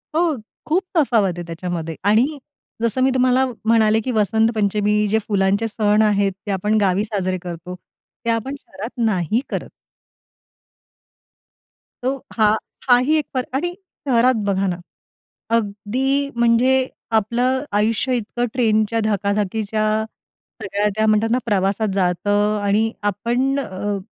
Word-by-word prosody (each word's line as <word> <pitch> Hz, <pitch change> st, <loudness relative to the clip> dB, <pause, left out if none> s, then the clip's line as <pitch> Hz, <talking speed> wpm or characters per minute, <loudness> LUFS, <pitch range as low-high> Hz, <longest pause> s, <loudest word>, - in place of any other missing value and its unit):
हो, 330 Hz, -2 st, +2 dB, 0.3 s
खूप 355 Hz, +5 st, +1 dB
तफावत 225 Hz, -, +3 dB
आहे 175 Hz, -, -4 dB
त्याच्यामध्ये. 165 Hz, -1 st, -4 dB
आणि 235 Hz, +9 st, +3 dB, 0.4 s
जसं 230 Hz, +2 st, 0 dB
मी 265 Hz, -, +4 dB
तुम्हाला 255 Hz, +1 st, +3 dB, 0.2 s
म्हणाले, 220 Hz, -1 st, +4 dB
की 255 Hz, +3 st, -3 dB
वसंत 220 Hz, +1 st, +2 dB
पंचमी 210 Hz, 0 st, +1 dB
जे 220 Hz, +2 st, +2 dB
फुलांचे 200 Hz, +1 st, +1 dB
सण 210 Hz, -1 st, +2 dB
आहेत. 205 Hz, -2 st, +2 dB
ते 205 Hz, -, -2 dB
आपण 210 Hz, +3 st, +1 dB
गावी 195 Hz, +1 st, +2 dB
साजरे 185 Hz, -4 st, -2 dB
करतो. 175 Hz, +1 st, -7 dB, 0.5 s
ते -, -, 0 dB
आपण 230 Hz, +4 st, -1 dB
शहरात 205 Hz, +4 st, -8 dB, 0.2 s
नाही 210 Hz, +2 st, +1 dB
करत. -, -, -4 dB, 2.3 s
तो 260 Hz, +2 st, 0 dB, 0.2 s
हा 215 Hz, -1 st, +5 dB, 0.4 s
हा 245 Hz, -, +8 dB
ही 310 Hz, -, +4 dB
एक 305 Hz, -, -1 dB
फरक 255 Hz, -1 st, -1 dB
आणि 350 Hz, +6 st, -1 dB, 0.3 s
शहरात 250 Hz, 0 st, +4 dB
बघा 195 Hz, 0 st, +1 dB
ना, 180 Hz, -, -1 dB, 0.8 s
अगदी 250 Hz, +7 st, -1 dB
म्हणजे 235 Hz, +2 st, +4 dB, 0.5 s
आपलं 250 Hz, +5 st, 0 dB
आयुष्य 225 Hz, +5 st, +1 dB
इतकं 240 Hz, +2 st, -2 dB
ट्रेनच्या 225 Hz, -2 st, +1 dB
धकाधकीच्या 210 Hz, +1 st, 0 dB, 0.8 s
सगळ्या 205 Hz, +1 st, 0 dB
त्या 220 Hz, 0 st, +2 dB
म्हणतात 215 Hz, +1 st, +3 dB
ना, 245 Hz, -, +3 dB
प्रवासात 200 Hz, +1 st, +1 dB
जातं 205 Hz, +3 st, +1 dB
आणि 210 Hz, +3 st, +2 dB, 0.2 s
आपण 250 Hz, +7 st, 0 dB
अ, 200 Hz, -2 st, -3 dB
215 Hz, 130 wpm, -20 LUFS, 200-245 Hz, 2.3 s, हा